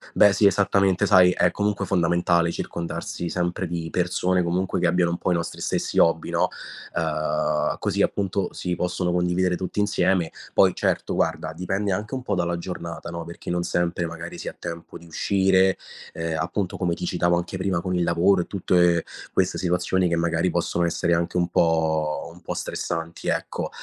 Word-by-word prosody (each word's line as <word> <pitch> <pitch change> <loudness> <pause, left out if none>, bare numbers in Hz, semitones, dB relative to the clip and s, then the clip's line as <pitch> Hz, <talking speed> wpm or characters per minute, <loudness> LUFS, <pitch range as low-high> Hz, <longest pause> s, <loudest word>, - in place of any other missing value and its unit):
Beh, 105 -1 +6
sì, 105 - +3
esattamente, 100 -2 +3
sai, 90 -2 +6
è, - - +2
comunque, 105 -1 -1
fondamentale 85 -1 +2
circondarsi 85 0 -4
sempre 90 +1 -1
di 85 -1 -4
persone, 90 0 +1
comunque, 90 +2 -1
che 85 - +3
abbiano 85 0 +2
un 85 - -2
po' 90 - -1
i - - +3
nostri 85 0 -4
stessi - - -1
hobby, 85 -1 +3
no, - - +2 0.5
ehm, 75 -1 0
così, - - 0
appunto, 100 -1 0
si 90 -1 -3
possono 90 0 -1
condividere 90 +1 +1
tutti 95 +3 -4
insieme. 95 -4 +2 0.2
Poi, - - +5
certo, - - 0
guarda, 80 -1 -1
dipende 95 +3 -1
anche 105 +6 -4
un 130 -1 -3
po' 105 -5 -1
dalla 85 0 0
giornata, 85 -1 -6
no, 85 0 -5
perché 85 +1 -9
non 85 0 0
sempre, 85 0 0
magari, 85 +1 -7
si - - -5
ha - - -10
tempo 85 0 -7
di 85 - -16
uscire, 95 +2 +2 0.3
ehm, 80 -1 -3
appunto, 90 +3 -2
come 90 -2 0
ti 90 - -4
citavo 85 0 +1
anche 85 +2 -4
prima 95 -2 0
con 90 +1 -2
il 90 - +1
lavoro 90 +3 +3
e - - -6
tutte 85 -3 +2 0.3
queste 95 -1 +1
situazioni 90 0 +1
che, 85 - +1
magari, 85 +1 +1
possono 85 0 0
essere 85 0 +1
anche 85 +1 -1
un 90 -1 +2
po' 80 -2 +1
un 90 - -16
po' - - -4
stressanti, 85 -1 -4
ecco. - - -2
85 Hz, 185 wpm, -24 LUFS, 85-95 Hz, 0.5 s, Beh